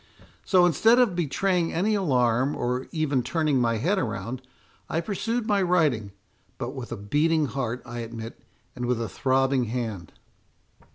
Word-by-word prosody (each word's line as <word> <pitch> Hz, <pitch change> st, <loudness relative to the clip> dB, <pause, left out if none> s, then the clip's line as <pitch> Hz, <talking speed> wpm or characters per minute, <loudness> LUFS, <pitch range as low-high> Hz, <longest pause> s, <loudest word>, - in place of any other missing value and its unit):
So, 180 Hz, -2 st, +4 dB
instead 225 Hz, +7 st, +4 dB
of 240 Hz, -8 st, +3 dB
betraying 175 Hz, +2 st, 0 dB
any 200 Hz, +6 st, +1 dB
alarm, 130 Hz, -, +2 dB
or 125 Hz, +1 st, -2 dB
even 150 Hz, -5 st, 0 dB
turning 145 Hz, +1 st, +1 dB
my 115 Hz, -1 st, +1 dB
head 180 Hz, -, +1 dB
around, 120 Hz, +1 st, -4 dB, 0.5 s
I 160 Hz, -, 0 dB
pursued 220 Hz, +6 st, -2 dB
my 205 Hz, -2 st, +2 dB
writing, 155 Hz, -, +1 dB, 0.5 s
but 125 Hz, -1 st, -4 dB
with 130 Hz, -4 st, -7 dB
a -, -, -3 dB
beating 150 Hz, +10 st, +1 dB
heart, 125 Hz, -1 st, -3 dB
I 120 Hz, -1 st, -6 dB
admit, 115 Hz, 0 st, -7 dB, 0.3 s
and 125 Hz, -1 st, -3 dB
with 125 Hz, -2 st, 0 dB
a 115 Hz, -, -2 dB
throbbing 130 Hz, +3 st, +1 dB
hand." 110 Hz, -7 st, -4 dB
135 Hz, 155 wpm, -26 LUFS, 120-175 Hz, 0.5 s, So